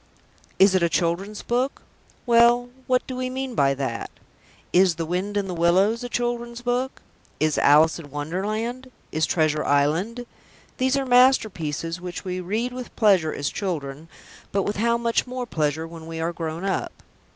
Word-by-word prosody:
Is 195 0 +6
it 185 - +3
a 170 - +3
children's 185 +5 -1
book? 250 +3 -1 0.4
Well, 240 0 +5 0.2
what 255 0 +2
do 260 - -6
we 255 0 -2
mean 260 0 -4
by 140 -9 +2
that? 130 -4 -3 0.6
Is 180 -1 +5
The 165 0 -3
Wind 185 +5 -2
in 200 -1 -1
the 185 - -4
Willows 190 +7 +2
a 245 - -5
children's 240 0 -3
book? 250 +2 -2 0.4
Is 155 -1 +1
Alice 155 +4 +5
in 150 -3 -10
Wonderland? 215 - -3 0.2
Is 155 +1 +1
Treasure 155 -2 +1
Island? 165 +13 +1 0.5
These 260 +1 +2
are 275 - -1
masterpieces 185 - +2
which 180 +1 -6
we 185 0 -3
read 220 +7 -2
with 250 -1 -8
pleasure 190 -8 +4
as 145 0 -3
children, 160 -5 -4 0.4
but 195 0 +1
with 205 - -2
how 235 +2 +2
much 235 +1 0
more 250 0 -4
pleasure 155 -5 -1
when 165 -1 -10
we 165 0 -6
are 165 +1 -1
grown 165 +2 -4
up. 195 - -3
190 Hz, 170 wpm, -24 LUFS, 160-240 Hz, 0.6 s, Is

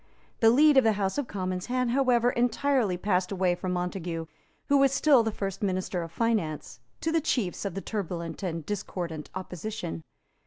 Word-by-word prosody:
The 225 - +6
lead 290 +4 +6
of 265 - +7
the 220 -1 +4
House 200 +4 -1
of 280 - -2
Commons 185 -2 -3
had, 250 0 0
however, 250 -2 +3
entirely 245 -4 +1
passed 180 -1 0
away 185 -2 +2
from 180 +1 -3
Montague, 175 -2 -3 0.4
who 285 - +4
was 275 -1 +5
still 275 -2 +5
the 225 -1 -1
first 195 -2 -4
minister 185 -2 -1
of 165 -1 -6
finance, 205 -8 -1 0.2
to 320 - 0
the 325 0 +2
chiefs 230 - -1
of 195 - -3
the 195 - -3
turbulent 175 -6 -4
and 165 -5 -3
discordant 175 -5 -4
opposition. 185 - -5
195 Hz, 180 wpm, -28 LUFS, 180-245 Hz, 0.4 s, of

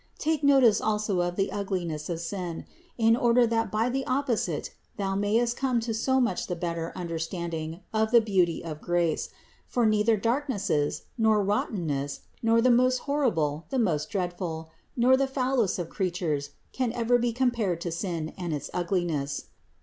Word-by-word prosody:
Take 315 -1 0
notice 270 -6 +5
also 210 -3 0
of 175 0 -1
the 195 +1 0
ugliness 180 -6 -3
of 170 -1 -2
sin, 170 0 -4 0.3
in 225 -1 +4
order 240 0 +4
that 225 -1 0
by 220 +2 +1
the 265 +2 -1
opposite 250 - -1 0.2
thou 195 -2 -1
mayest 220 +5 +1
come 255 -3 +1
to 225 0 -2
so 260 +4 +1
much 235 -8 0
the 180 - -2
better 170 -1 -3
under 170 -3 -4
standing 165 0 -4
of 220 0 +2
the 235 +1 +7
beauty 190 -6 +1
of 155 -2 -6
grace; 175 -2 0 0.4
for 240 -2 +1
neither 215 +1 +3
darknesses, 225 - 0 0.2
nor 220 -2 +4
rottenness, 165 -8 -1 0.2
nor 230 0 +3
the 255 - +5
most 255 +1 +3
horrible, 170 - 0
the 270 - -1
most 170 -10 +1
dreadful, 175 -5 -3 0.3
nor 250 +2 +5
the 270 +1 +1
foulest 260 -5 0
of 175 -2 -4
creatures 170 -7 -1 0.2
can 255 -3 -1
ever 245 +1 +2
be 240 0 +1
compared 230 -8 0
to 170 - -3
sin 165 -2 -3
and 175 -3 -2
to - - +1
its 145 - -8
ugliness. 170 -6 -1
200 Hz, 170 wpm, -27 LUFS, 170-235 Hz, 0.4 s, the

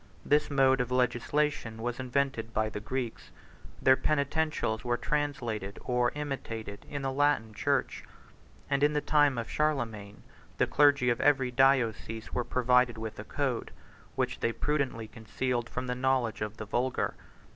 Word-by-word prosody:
This 150 +1 +3
mode 135 -2 +4
of 125 - -2
legislation 125 0 0
was 120 +2 -3
invented 130 -3 -1
by 110 0 +1
the 105 - -5
Greeks; 120 +2 -4 0.5
their 130 - +6
penitentials 150 -5 0
23 120 - -7
were 120 - +2
translated, 120 -10 -2
or 125 -1 +2
imitated, 115 -8 -5
in 140 -1 -4
the 135 - -1
Latin 135 -6 +1
church; - - -1 0.6
and, 140 0 0
in 145 +1 +4
the 150 - +2
time 145 -4 +3
of 115 -2 -3
Charlemagne, 115 -9 -2 0.3
the - - +3
clergy 145 -4 +4
of 120 - -1
every 135 -3 +3
diocese 120 -4 +1
were 125 - 0
provided 125 -1 +2
with 110 -1 -6
a - - -5
code, - - -2 0.5
which - - -1
they 115 - +1
prudently 135 -4 -1
concealed 115 +2 -3
from 125 - -4
the 125 - -1
knowledge 125 -3 0
of 105 +1 -4
the 110 - -6
vulgar. 120 +4 -1
125 Hz, 155 wpm, -30 LUFS, 115-140 Hz, 0.6 s, their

